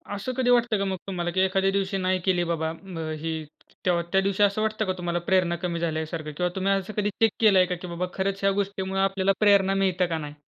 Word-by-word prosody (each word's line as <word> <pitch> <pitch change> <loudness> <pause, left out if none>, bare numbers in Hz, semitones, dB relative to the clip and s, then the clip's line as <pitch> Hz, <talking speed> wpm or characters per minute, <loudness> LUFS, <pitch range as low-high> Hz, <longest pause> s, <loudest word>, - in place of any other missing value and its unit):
असं 205 +6 -4
कधी 250 -1 +1
वाटतं 240 -2 +3
का 200 - -1
मग 190 -1 -2
तुम्हाला, 175 -2 -2
की 185 - -1
एखाद्या 190 +1 +2
दिवशी 195 0 -1
नाही 185 0 0
केली 180 -2 +2
बाबा, 160 -1 -1
म 190 -3 -9 0.2
ही 165 +1 -3 0.5
तेव्हा 175 -2 +2
त्या 190 0 +4
दिवशी 200 +1 +1
असं 205 +1 +2
वाटतं 215 0 0
का, 185 - 0
तुम्हाला 175 -1 -2
प्रेरणा 185 -2 +3
कमी 170 -1 -2
झाल्यासारखं 160 -1 -3
किंवा 180 0 +1
तुम्ही 195 +1 0
असं 195 +2 -2
कधी 205 0 +1
चेक 225 -2 +4
केलंय 195 -5 +5
का, 180 0 -3
की 180 +1 -8
बाबा 170 +1 -3
खरंच 195 0 -1
ह्या 195 0 +3
गोष्टीमुळे 195 -1 -3
आपल्याला 195 0 +2
प्रेरणा 200 -2 +4
मिळतं 185 -1 +2
का 165 -2 -2
नाही? 150 -1 -7
190 Hz, 235 wpm, -25 LUFS, 175-195 Hz, 0.5 s, केलंय